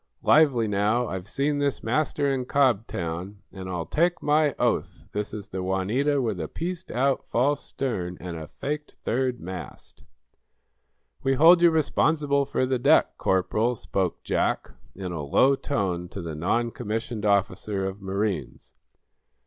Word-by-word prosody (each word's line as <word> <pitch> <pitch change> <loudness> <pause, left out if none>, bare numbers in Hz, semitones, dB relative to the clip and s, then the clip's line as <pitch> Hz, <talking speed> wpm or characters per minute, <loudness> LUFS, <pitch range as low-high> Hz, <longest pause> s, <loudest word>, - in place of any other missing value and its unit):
Lively, 135 -8 +4
now! 105 +4 +1
I've 95 -2 -5
seen 145 +6 0
this 140 -1 -1
master 145 +4 0
in 130 -2 -2
Cobtown, 100 -8 0
and 95 -1 -7
I'll 90 -2 -3
take 175 - +1
my 150 -1 +3
oath - - -1
this 105 0 -3
is 105 -1 -7
the 95 -1 -4
'Juanita' 105 +11 +1
with 105 -7 -2
a 80 - -3
pieced 175 - -5
out, 135 +2 +1
false 140 +4 +1
stern 90 -10 -3
and 90 -1 -6
a 80 -2 -7
faked 150 - -5
third 125 +1 -1
mast!" 90 +1 -9 1.2
"We 135 0 +1
hold 170 +5 +7
you 175 - +7
responsible 150 -2 +2
for 130 - 0
the 130 -1 0
deck, - - +4
Corporal," 105 +6 +1
spoke 95 -5 -2
Jack, - - 0 0.2
in 95 -2 -5
a 85 -3 -4
low 130 - +4
tone 95 -11 -2
to 100 - -6
the 80 -1 -5
noncommissioned 115 +5 -2
officer 100 -1 0
of 95 +1 -5
marines. 95 -2 -3
110 Hz, 150 wpm, -26 LUFS, 95-140 Hz, 1.2 s, hold